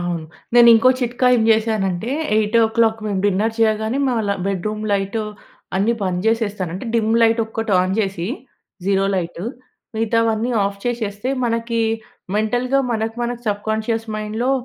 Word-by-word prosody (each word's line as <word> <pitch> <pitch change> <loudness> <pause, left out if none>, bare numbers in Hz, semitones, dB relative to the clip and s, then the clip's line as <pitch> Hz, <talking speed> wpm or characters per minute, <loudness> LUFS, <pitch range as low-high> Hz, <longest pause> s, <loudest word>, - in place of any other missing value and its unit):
అవును. 175 -2 -3 0.3
నేను 240 -1 +8
ఇంకో 225 +3 +5
చిట్కా 245 +1 0
ఏం 225 - +2
జేశానంటే, 220 -2 +1 0.3
8:00 225 +1 +2
మేము 195 -2 -1
డిన్నర్ 210 +3 +1
చెయ్యగానే, 220 +3 +1
మేము 245 -3 +1
అలా 200 -1 0
బెడ్రూమ్ 210 +3 -2
లైటు 200 +2 -1 0.5
అన్ని 205 +5 +2
బంద్ 180 -1 -1
చేసేస్తాను. 210 -6 0
అంటే, 195 - -6
dim 220 -1 +2
లైటొక్కటి 225 -1 +1
on 185 +1 0
JC, 190 -4 -1 0.6
zero 195 0 +2
light, 175 +1 -4 0.5
మిగతావన్నీ 225 +1 +1
ఆఫ్ 200 0 -3
చేసేస్తే, 230 0 -2
మనకీ 230 0 -1 0.6
మెంటల్‌గా 245 +5 +1
మనకి, 225 +1 -2
మనకి 240 0 -3
సబ్‌కోన్షియస్ 220 +2 -1
మైండ్‌లో 215 +4 -2
220 Hz, 135 wpm, -20 LUFS, 200-230 Hz, 0.6 s, నేను